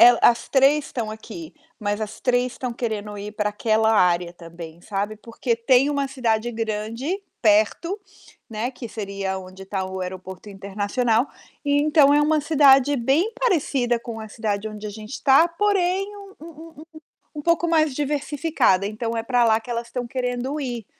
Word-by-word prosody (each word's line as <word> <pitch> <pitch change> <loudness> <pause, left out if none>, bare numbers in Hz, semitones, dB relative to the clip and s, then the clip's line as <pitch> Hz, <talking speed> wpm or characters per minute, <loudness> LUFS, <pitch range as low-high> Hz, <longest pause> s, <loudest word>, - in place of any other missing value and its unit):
É, 235 +1 +10
as 235 0 +4
3 280 +2 +4
estão 225 -4 -4
aqui, 210 -6 -9 0.3
mas 205 0 -2
as 215 -1 -5
3 250 0 +1
estão 250 -1 -4
querendo 215 -3 -4
ir 205 +1 -6
para 210 0 -1
aquela 220 +1 +2
área 175 -4 +3
também, 170 -1 -11
sabe. 205 +2 -3
Porque 230 +2 -2
tem 255 +4 +3
uma 280 -1 0
cidade 240 -3 0
grande 225 - -3 0.2
perto, 220 - +2 0.5
né, 225 +3 -2
que 250 -2 -8
seria 195 -3 -4
onde 185 +1 -11
tá 190 -1 -3
o 190 0 -5
aeroporto 185 +2 -7
internacional, 205 +5 0 0.4
e 285 0 +3
então 295 -2 +5
é 295 - +5
uma 305 +1 +3
cidade 285 -2 +5
bem 280 - +1
parecida 280 - +1
com 230 -1 -7
a 220 0 -7
cidade 210 -1 -3
onde 215 0 -8
a - - -6
gente 215 +4 -8
tá, 275 +5 +6
porém 390 +2 0
um 400 -1 -12
um - - -10
um 325 0 -12
um - - -11 0.6
um - - -4
pouco 335 +2 +2
mais 315 -3 +3
diversificada. 290 - +1
Então 225 +2 -4
é 225 - -2
pra 245 0 +2
lá 220 -1 +4
que 225 - -15
elas 235 0 -4
tão 245 -1 -3
querendo 250 +3 -2
ir, 240 -6 -4
235 Hz, 175 wpm, -23 LUFS, 210-285 Hz, 0.6 s, É